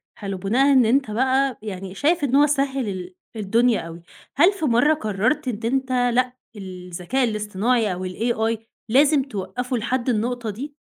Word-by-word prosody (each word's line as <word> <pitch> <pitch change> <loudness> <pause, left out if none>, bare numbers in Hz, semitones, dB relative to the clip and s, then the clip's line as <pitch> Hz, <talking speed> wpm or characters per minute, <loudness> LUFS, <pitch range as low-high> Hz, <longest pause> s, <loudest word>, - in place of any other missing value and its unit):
حلو، 195 -2 -5
بناءً 250 +9 +2
إن 255 -3 +5
أنت 260 -1 +2
بقى 260 +2 +1
يعني 190 -2 -6
شايف 300 - +1
إن 270 0 +2
هو 295 +1 +6
سهّل 275 -4 0
ال 185 -1 -6 0.2
الدنيا 225 +2 +2
أوي، 165 +1 -9 0.3
هل 350 +8 +6
في 375 -5 -5
مرة 280 +4 +4
قرّرت 215 +5 -1
إن 225 -2 -3
أنت 265 -1 -1 0.2
لأ 250 0 +2 0.2
الذكاء 185 +5 -3
الاصطناعي 215 0 0
أو 185 +1 -4
الAI 225 +3 -1 0.3
لازم 280 +3 +4
توقّفه 250 +2 -4
لحد 245 +3 -2
النقطة 240 0 -1
دي؟ 280 +8 -7
240 Hz, 160 wpm, -22 LUFS, 200-270 Hz, 0.3 s, هو